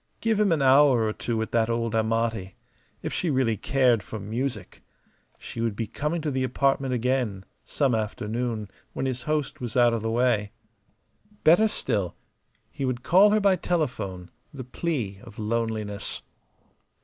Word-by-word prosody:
Give 225 -2 +1
him 210 -3 +3
an 155 -4 +2
hour 135 -2 +6
or 110 - -1
two 115 0 -3
with 110 0 -2
that 115 -1 +2
old 115 -1 -1
Amati 110 -3 0 0.5
if - - -3
she 180 - -1
really 130 -5 +2
cared 125 0 +2
for 110 +3 -7
music! 110 0 -4 0.6
She 115 - -7
would 115 -3 -1
be 115 - -2
coming 150 +9 -3
to 150 - -1
the 130 -1 0
apartment 135 +1 +1
again 120 -6 -1 0.2
some 140 -4 +1
afternoon, 110 0 -2 0.2
when - - -2
his 130 -2 -2
host 150 -2 -2
was 120 -1 -3
out 120 -1 +5
of 115 - -1
the 115 - -2
way. 115 -3 +1 0.9
Better 175 +8 +6
still, 100 - -2 0.6
he - - -5
would 130 -2 -2
call 190 +8 +6
her 215 +1 +3
by 200 -2 +4
telephone; 125 - -2 0.2
the 135 -2 -7
plea 125 - -3
of 115 -4 -13
loneliness. 110 -2 -3
120 Hz, 160 wpm, -26 LUFS, 110-140 Hz, 0.9 s, hour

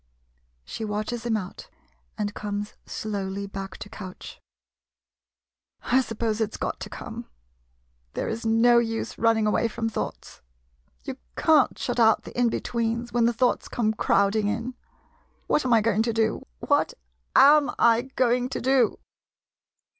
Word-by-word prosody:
[She 75 - -6
watches 215 +3 -3
him 220 -2 +2
out, 200 - -8 0.5
and 205 -1 -2
comes 205 0 -4
slowly 200 -2 -4
back 195 -1 -7
to - - -8
couch.] 185 -3 -10 1.4
I 260 +2 +3
suppose 225 -2 -2
it 215 - 0
's - - -7
got - - -3
to - - -7
come! - - -8 0.9
There - - -2
is 225 +1 -4
no 230 +2 +5
use 225 -1 -3
running 225 -1 +3
away 215 +2 +2
from 225 0 -3
thoughts. 220 - -6 0.6
You - - -6 0.2
can't 305 -4 +4
shut 245 -1 -2
out 220 -2 +5
the - - -11
in 245 -1 +3
betweens, 235 +1 -2
when 240 -1 +3
the 235 - +4
thoughts 245 +1 +1
come 220 -2 0
crowding 205 0 +2
in.... 230 +4 -2 0.7
What 300 - +1
am 250 - 0
I 225 - +5
going 220 -1 +2
to 230 0 0
do? 220 -1 0
What - - +1 0.4
am 290 +1 +7
I 230 0 +5
going 250 0 +2
to - - -3
do? 265 0 +2
225 Hz, 150 wpm, -25 LUFS, 210-240 Hz, 1.4 s, am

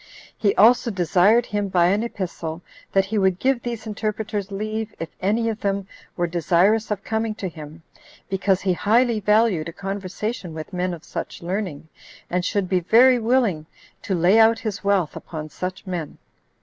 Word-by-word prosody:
He 200 -2 +1
also 235 +3 +5
desired 195 +4 +3
him, 205 -1 -2
by 180 -2 +3
an 200 +3 +2
epistle, 175 -7 -5 0.3
that 195 0 +3
he 210 +2 -1
would 190 -2 +2
give 260 +2 +1
these 235 -2 -5
interpreters 215 -1 -3
leave, 215 +2 -4
if 165 - -4
any 220 +4 +1
of 225 -1 -2
them 200 -1 -1 0.3
were 175 - +1
desirous 175 +6 +2
of 210 -1 -3
coming 220 -1 -2
to 205 -3 -4
him, 160 -1 -10 0.4
because 195 0 +1
he 190 -2 +1
highly 230 +4 +2
valued 210 -6 +2
a - - -10
conversation 195 -1 -5
with 155 +4 -8
men 180 0 -1
of 165 - -15
such - - -6
learning, 175 -4 -4 0.4
and 180 0 0
should 200 0 0
be 185 0 +2
very 245 +8 +5
willing 225 -10 +1 0.3
to 195 -4 -2
lay 180 +6 +4
out 225 0 +6
his 215 -4 -5
wealth 200 -5 +1
upon 155 -2 -7
such 185 +6 -6
men. 175 -5 -5
200 Hz, 175 wpm, -23 LUFS, 180-220 Hz, 0.4 s, out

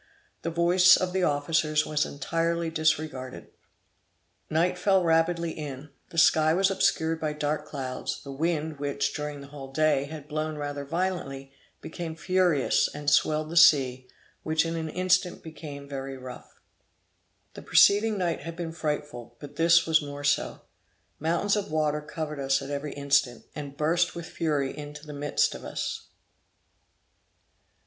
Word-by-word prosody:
The - - -2
voice 175 +2 +5
of 180 -1 -2
the 190 - +1
officers 155 0 +1
was 150 0 0
entirely 165 +3 -1
disregarded. 155 -5 -2 1.0
Night 165 +3 +1
fell 190 -2 +2
rapidly 165 0 +2
in, 145 -2 -7 0.2
the 165 - -11
sky 160 0 +5
was 195 +1 +3
obscured 165 -4 +1
by 155 -1 -1
dark 150 0 -2
clouds; 130 -3 -4
the 140 - -8
wind 155 0 -2
which, 140 0 -1
during 150 -1 -5
the 140 - -11
whole 135 -2 -9
day, 155 -1 +2
had 150 0 -9
blown 155 0 -3
rather 145 -1 -4
violently, 150 -5 -3 0.3
became 160 0 -6
furious 180 -5 +2
and 145 0 -2
swelled 155 0 +2
the - - -5
sea, 135 -7 +5 0.3
which 160 0 +1
in 165 0 -2
an 160 -1 -3
instant 180 +1 +1
became 150 -3 -9
very 135 -1 -6
rough. 130 -1 -11 0.9
The - - -9
preceding 210 +1 +4
night 175 -3 -1
had 165 0 -7
been 170 -1 -4
frightful, 150 -7 -4
but 145 - -10
this 170 +1 +5
was 160 -1 +3
more 145 0 -7
so. 145 0 0 0.6
Mountains 170 +6 +1
of 205 -1 -2
water 150 -1 0
covered 150 0 -5
us 135 0 +1
at 135 - -7
every 145 +1 -4
instant, 140 -3 +1
and 140 -2 -7
burst 165 +3 +1
with 170 -1 -6
fury 145 -6 -1
into 150 0 -9
the 150 - -8
midst 145 0 0
of - - -9
us. - - -4
155 Hz, 155 wpm, -27 LUFS, 145-165 Hz, 1.0 s, voice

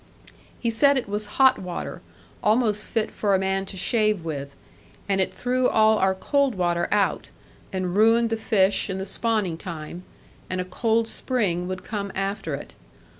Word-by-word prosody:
He 235 - 0
said 280 +5 +4
it 250 - -2
was 210 +1 -3
hot 265 -1 +6
water, 180 -2 -6 0.4
almost 215 -1 +2
fit 225 -1 -1
for 200 -2 +1
a - - +4
man 190 0 -1
to 190 - -7
shave 210 -1 +1
with, 140 -3 -5 0.5
and 195 -1 +1
it 190 - 0
threw 250 0 0
all 220 0 +4
our 190 0 +2
cold 280 +4 +1
water 175 -2 0
out, 205 -2 +1 0.4
and 185 -1 -2
ruined 225 +2 +4
the - - +2
fish 205 -3 +2
and 190 0 -3
the 190 - -3
spawning 205 -5 0
time, 170 0 -7 0.5
and 185 - -2
a 180 - -2
cold 225 +4 0
spring 195 -10 -1
would 185 0 -5
come 200 -2 -4
after 195 +1 -2
it. - - -10
200 Hz, 175 wpm, -24 LUFS, 185-225 Hz, 0.5 s, hot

